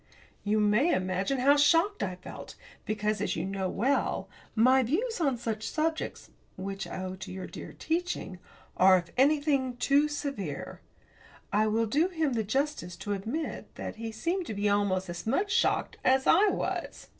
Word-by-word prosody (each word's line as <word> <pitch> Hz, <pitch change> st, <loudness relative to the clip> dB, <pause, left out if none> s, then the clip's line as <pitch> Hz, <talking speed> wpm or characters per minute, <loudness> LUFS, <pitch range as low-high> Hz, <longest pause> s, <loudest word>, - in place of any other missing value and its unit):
You 210 Hz, +1 st, +1 dB
may 210 Hz, +10 st, +3 dB
imagine 185 Hz, +7 st, 0 dB
how 280 Hz, +3 st, +5 dB
shocked 330 Hz, +8 st, +4 dB
I 185 Hz, -2 st, -2 dB
felt, 180 Hz, -, -10 dB, 0.3 s
because, 215 Hz, 0 st, -1 dB
as -, -, -1 dB
you -, -, -2 dB
know 190 Hz, -1 st, -2 dB
well, 265 Hz, +9 st, 0 dB, 0.3 s
my 255 Hz, +4 st, +5 dB
views 365 Hz, -, -1 dB
on 275 Hz, -6 st, +2 dB
such 220 Hz, -2 st, -3 dB
subjects 315 Hz, +1 st, -2 dB, 0.3 s
which 195 Hz, +1 st, -5 dB
I 185 Hz, -, -5 dB
owe 185 Hz, 0 st, -4 dB
to 190 Hz, -, -8 dB
your 185 Hz, 0 st, -6 dB
dear -, -, -9 dB
teaching 330 Hz, -, -3 dB, 0.4 s
are, 185 Hz, 0 st, +7 dB
if 175 Hz, -1 st, -5 dB
anything, 275 Hz, -2 st, +2 dB
too 280 Hz, +4 st, +3 dB
severe. 275 Hz, -, -5 dB, 0.7 s
I 215 Hz, +1 st, +3 dB
will 225 Hz, +2 st, +2 dB
do 295 Hz, -, +2 dB
him 320 Hz, -7 st, -1 dB
the 225 Hz, -2 st, 0 dB
justice 260 Hz, -, -2 dB
to 205 Hz, +4 st, -4 dB
admit 230 Hz, +11 st, -4 dB
that -, -, -6 dB
he 225 Hz, 0 st, -5 dB
seemed 340 Hz, -, -2 dB
to 215 Hz, -, -4 dB
be 205 Hz, +1 st, 0 dB
almost 200 Hz, -2 st, +1 dB
as 175 Hz, +4 st, -6 dB
much 380 Hz, -, +1 dB
shocked -, -, +1 dB
as 265 Hz, +1 st, +3 dB
I 395 Hz, +6 st, +6 dB
was. -, -, -3 dB
230 Hz, 170 wpm, -29 LUFS, 195-295 Hz, 0.7 s, are